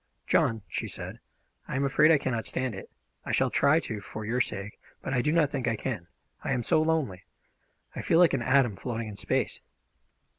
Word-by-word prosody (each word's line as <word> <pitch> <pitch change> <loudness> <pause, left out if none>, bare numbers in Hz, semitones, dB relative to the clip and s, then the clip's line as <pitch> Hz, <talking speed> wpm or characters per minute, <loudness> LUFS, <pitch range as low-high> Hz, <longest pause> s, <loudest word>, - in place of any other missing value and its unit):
"John," 110 -2 +2
she - - -3
said, - - -6 0.5
"I - - -4
am 135 - +1
afraid 150 +3 +5
I 160 - +7
cannot 125 -5 -2
stand 130 -2 -2
it. 95 - -8 0.3
I - - -4
shall - - +2
try 155 +3 +4
to, 110 -8 -5
for 110 +1 -7
your 120 +4 +1
sake, 100 -3 -4 0.2
but 135 - -3
I 125 - +2
do 150 - +1
not 155 -3 +3
think 130 -4 -2
I 115 - +2
can. 110 -7 -4 0.4
I - - 0
am 125 -2 -1
so 155 - +3
lonely! 155 - 0 0.7
I - - -3
feel 165 - +2
like 175 -1 +6
an 135 - +1
atom 120 -4 +3
floating 115 -2 -4
in 105 - -8
space." - - -1
125 Hz, 210 wpm, -28 LUFS, 110-140 Hz, 0.7 s, I